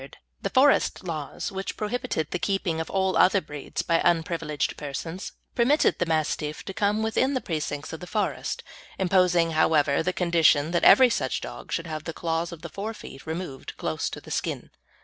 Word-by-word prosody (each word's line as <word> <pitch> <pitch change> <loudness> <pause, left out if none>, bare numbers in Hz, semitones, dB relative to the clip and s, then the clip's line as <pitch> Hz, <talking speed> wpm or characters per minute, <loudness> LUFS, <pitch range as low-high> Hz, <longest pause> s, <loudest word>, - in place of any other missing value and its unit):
the 195 - -1
Forest 265 0 +3
Laws, 155 0 -4
which 195 0 -5
prohibited 220 - -2
the 180 - -1
keeping 180 -5 0
of 160 - -6
all 190 -1 +1
other 195 +2 +5
breeds 150 -4 -5
by 165 -1 +2
unprivileged 165 -3 0
persons, 160 +6 -5 0.2
permitted 255 +5 +3
the 175 - +1
Mastiff 155 -1 -1
to 195 - -5
come 210 +2 +1
within 260 +5 +1
the - - +2
precincts 155 - -4
of 160 - -7
a 180 - -7
forest, 210 +1 -2 0.3
imposing, 180 -3 +3
however, 155 -2 +3
the 180 - 0
condition 165 -4 +3
that 175 - +1
every 260 -2 +8
such - - -1
dog - - -8
should 165 - -1
have 155 -2 -5
the 165 - -4
claws 165 +1 -2
of 170 -1 -10
the 170 - -6
fore 210 +7 -5
feet 135 - -11
removed 160 -4 -5
close - - -2
to - - -7
the - - -12
skin. - - -3
170 Hz, 185 wpm, -26 LUFS, 160-195 Hz, 0.3 s, every